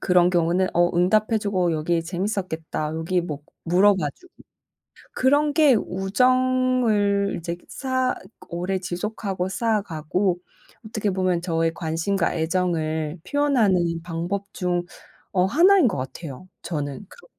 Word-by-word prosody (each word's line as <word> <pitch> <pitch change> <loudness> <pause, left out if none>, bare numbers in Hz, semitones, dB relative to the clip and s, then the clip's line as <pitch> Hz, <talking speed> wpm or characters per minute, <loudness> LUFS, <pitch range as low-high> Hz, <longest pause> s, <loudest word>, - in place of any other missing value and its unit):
그런 180 -1 +4
경우는 175 +1 +2
어 175 0 +4
응답해 215 +5 +3
주고 185 -4 0
'여기 165 +2 0
재밌었겠다.' 175 -4 -3
여기 175 +3 0
뭐 150 -4 -5 0.3
물어봐 190 +3 +3
주고 365 0 -21 0.8
그런 290 +3 +3
게 295 -4 +5
우정을 225 0 +2
이제 170 +1 -4
쌓아 260 -1 -1 0.3
오래 180 +2 -2
지속하고 185 +1 -3
쌓아가고 190 -5 -1 0.5
어떻게 215 -1 -2
보면 185 -2 0
저의 165 -2 0
관심과 170 +4 -1
애정을 160 -2 -1
표현하는 205 -13 +2
방법 175 +4 -3
중 175 -1 -1 0.5
어 180 -2 +3
하나인 345 - +5
것 185 - -3
같아요. 135 +4 -7
저는 145 +1 -4
그렇게 - - -16
185 Hz, 275 characters per minute, -23 LUFS, 170-215 Hz, 0.8 s, 게